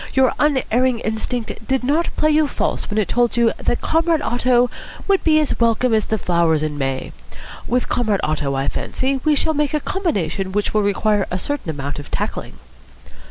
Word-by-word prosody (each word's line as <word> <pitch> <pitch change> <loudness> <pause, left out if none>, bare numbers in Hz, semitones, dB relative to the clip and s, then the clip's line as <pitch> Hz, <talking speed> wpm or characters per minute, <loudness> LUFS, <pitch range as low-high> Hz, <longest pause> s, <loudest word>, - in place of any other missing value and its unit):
"Your 265 -2 +4
unerring 260 -4 +2
instinct 220 0 -3
did 265 -1 0
not 300 +6 +1
play 310 0 +3
you 305 0 +3
false - - -2
when 210 - -3
it 210 -4 +1
told 240 +2 +1
you 235 -1 +3
that 240 - -1
Comrade 325 -1 +1
Otto 245 0 +2 0.4
would 395 -1 +2
be 310 -1 +4
as 305 - -1
welcome 230 +1 +2
as 215 -1 +2
the 220 - -1
flowers 170 -5 +1
in 155 -1 -2
May. 135 -2 -3 0.6
With 250 +1 0
Comrade 215 -5 0
Otto 145 -3 -1
I 135 +1 -1
fancy 265 +1 -2
we 305 -1 +3
shall 315 +2 +1
make 295 0 0
a - - +1
combination 195 - -2
which 205 0 -1
will 215 - +3
require 205 0 +1
a 180 - -2
certain 285 - -3
amount 145 -1 -4
of 145 - -9
tackling." - - -4
235 Hz, 190 wpm, -20 LUFS, 190-285 Hz, 0.6 s, Your